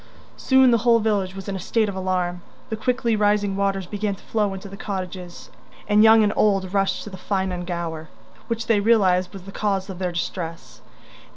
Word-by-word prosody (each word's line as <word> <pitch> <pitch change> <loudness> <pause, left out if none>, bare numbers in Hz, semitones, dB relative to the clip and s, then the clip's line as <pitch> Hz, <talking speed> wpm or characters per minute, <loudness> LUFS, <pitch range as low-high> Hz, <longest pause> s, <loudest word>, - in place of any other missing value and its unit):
Soon 265 -1 +4
the 235 - +4
whole 230 +1 +4
village 205 -4 0
was 195 +1 -8
in 200 - -3
a - - -4
state 220 +4 0
of 200 - -4
alarm. 180 -2 -1 0.3
The 220 - -2
quickly 235 0 0
rising 205 -1 +1
waters 195 -1 0
began 205 +1 -3
to - - -19
flow 210 -3 0
into 190 +1 -8
the 195 - -9
cottages, 185 -3 -6 0.4
and 210 0 +4
young 220 0 +7
and 210 0 +1
old 195 -3 +1
rushed 195 -1 0
to 210 - -9
Ffynnon 190 -1 -3
Gower, 165 -3 -4 0.4
which 230 -1 -2
they 225 -2 +3
realised 190 -4 +3
was 195 -2 -10
the 195 - -10
cause 195 -2 -1
of 185 - -9
their 180 -1 -1
distress. 170 -1 -5
195 Hz, 195 wpm, -23 LUFS, 185-215 Hz, 0.4 s, young